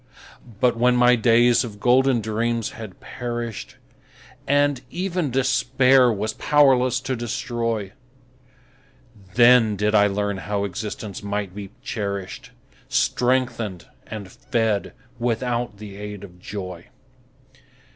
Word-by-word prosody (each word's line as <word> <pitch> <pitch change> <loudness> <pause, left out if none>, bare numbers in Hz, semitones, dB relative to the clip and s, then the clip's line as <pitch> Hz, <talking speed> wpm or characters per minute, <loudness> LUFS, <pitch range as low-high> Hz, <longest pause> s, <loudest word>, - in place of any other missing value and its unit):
But 125 -1 +3
when 125 +1 +3
my 125 0 +5
days 120 +1 +4
of 105 -4 -8
golden 125 +1 +3
dreams 115 +1 -1
had 110 -5 -10
perished, 120 -2 -6 0.7
And 145 -2 +2
even 180 -2 -2
Despair 130 0 +3
was 110 +1 -2
powerless 130 -4 +3
to 130 0 -2
destroy, 115 -3 -3 1.4
Then 120 -3 +6
did 105 +2 0
I 105 -1 +5
learn 100 0 -1
how 100 +1 -2
existence 100 +1 -5
might 100 -2 -3
be 100 -1 -7
cherished, 100 -6 -4 0.4
Strengthened 120 -7 0 0.2
and 105 -4 -7
fed 110 -3 -1 0.3
without 120 -2 -1
the 100 -1 -10
aid 105 -1 -7
of 90 -3 -12
joy. 90 -3 -7
115 Hz, 110 wpm, -23 LUFS, 105-125 Hz, 1.4 s, Then